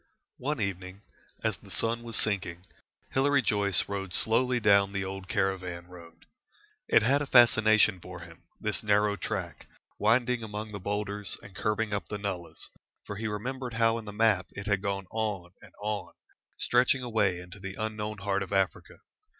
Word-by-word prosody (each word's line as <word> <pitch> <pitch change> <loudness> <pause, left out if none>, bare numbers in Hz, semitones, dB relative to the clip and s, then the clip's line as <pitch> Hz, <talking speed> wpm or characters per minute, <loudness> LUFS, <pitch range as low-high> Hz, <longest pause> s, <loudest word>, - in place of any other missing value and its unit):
One 145 +1 -2
evening, 95 0 -4 0.4
as - - 0
the - - -16
sun 115 +1 0
was 115 -1 -2
sinking, 95 -4 -1 0.5
Hilary 140 0 +3
Joyce 100 -4 +2
rode 95 -2 -4
slowly 125 +2 +3
down 100 -2 +4
the 100 -1 -1
old 95 0 -6
caravan 95 -3 -1
road. 85 -2 -14 0.6
It - - +5
had 140 +6 +3
a 145 - -2
fascination 110 -5 +6
for 90 -1 -9
him, 85 -1 -12 0.2
this - - -1
narrow 105 0 +3
track, 95 - -4 0.3
winding 120 0 +3
among 105 0 -5
the 105 - -5
boulders 105 +1 -3
and 100 -1 -13
curving 105 0 0
up 100 - -2
the 105 - -4
nullahs, 90 -5 -5 0.3
for 100 - -6
he 110 +1 -2
remembered 125 +3 -4
how 115 +1 +3
in 110 - -10
the 105 - -6
map 105 -4 +2
it 100 - -7
had 100 -2 +1
gone 100 -1 -2
on 105 -6 -2
and - - -15
on, 105 -1 -3 0.4
stretching 125 +1 +2
away 105 -6 +1
into 90 +2 -10
the 95 0 -6
unknown 110 0 -3
heart 100 0 -1
of 100 - -5
Africa. 95 -1 -1
105 Hz, 170 wpm, -29 LUFS, 95-110 Hz, 0.6 s, fascination